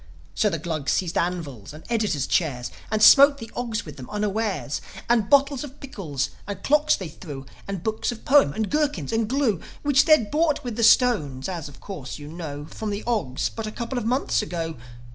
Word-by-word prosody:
So 210 - +2
the 165 - -2
Glugs 155 -3 -2
seized 180 -2 -1
anvils, 155 - -3
and 155 +1 -11
editors' 215 - 0
chairs, 135 -9 0 0.2
And 215 0 +1
smote 280 +5 +8
the 225 -4 -9
Ogs 230 -2 -3
with 150 - -10
them 130 -2 -9
unawares; 210 -6 -2 0.3
And 230 -3 +2
bottles 280 -1 +4
of 280 -1 -10
pickles, 165 - -4 0.2
and 205 - -6
clocks 300 +1 +4
they 185 -4 -6
threw, 145 -4 -9 0.2
And 195 -3 -4
books 220 +1 -1
of 235 - -10
poems, 285 - +5
and 220 -2 -2
gherkins, 290 - 0
and 225 -1 +1
glue, 250 - +1 0.2
Which 290 0 +4
they'd 305 -10 +4
bought 310 0 +1
with 245 -3 -4
the 230 - -1
stones 205 - +4
as, 170 -6 -5
of 140 - -16
course, 160 -11 -7
you 145 -1 -9
know 150 -3 -6
From 215 +5 -5
the 205 +1 -3
Ogs 205 - -1
but 225 -1 -6
a - - -4
couple 240 +3 -3
of 225 - -5
months 255 0 +1
ago. 165 -5 -4
210 Hz, 200 wpm, -24 LUFS, 155-245 Hz, 0.3 s, smote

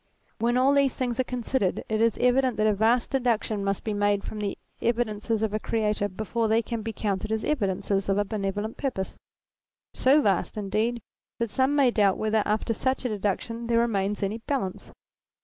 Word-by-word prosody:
When 240 +2 +2
all 265 +2 +4
these 280 -2 +3
things 245 -2 -2
are - - +4
considered 245 -5 -1
it 215 0 0
is 230 -1 +3
evident 250 -1 +3
that 215 - +2
a 215 - +4
vast 225 +4 +2
deduction 230 -5 0
must 195 -1 -1
be 215 - -2
made 205 -1 +1
from 215 - -6
the 205 -2 -2 0.2
evidences 225 -2 0
of 215 -1 0
a 215 - 0
Creator 210 -2 0
before 220 +4 -2
they 225 +2 +2
can 230 -1 -4
be 225 +1 -4
counted 210 0 -2
as 220 0 -1
evidences 200 -6 0
of 195 - +2
a 205 - +2
benevolent 205 +1 -3
purpose: 240 -9 -3 0.8
so 280 +3 +4
vast 195 +1 +1
indeed 215 +3 -1 0.3
that 235 -2 -2
some 265 +2 +2
may 270 -4 +4
doubt 200 -4 +3
whether 215 0 +1
after 215 +2 0
such 260 +4 -1
a - - +1
deduction 215 +3 -2
there 230 0 +2
remains 205 -3 0
any 205 +3 -2
balance. 230 -6 -3
220 Hz, 190 wpm, -26 LUFS, 205-240 Hz, 0.8 s, all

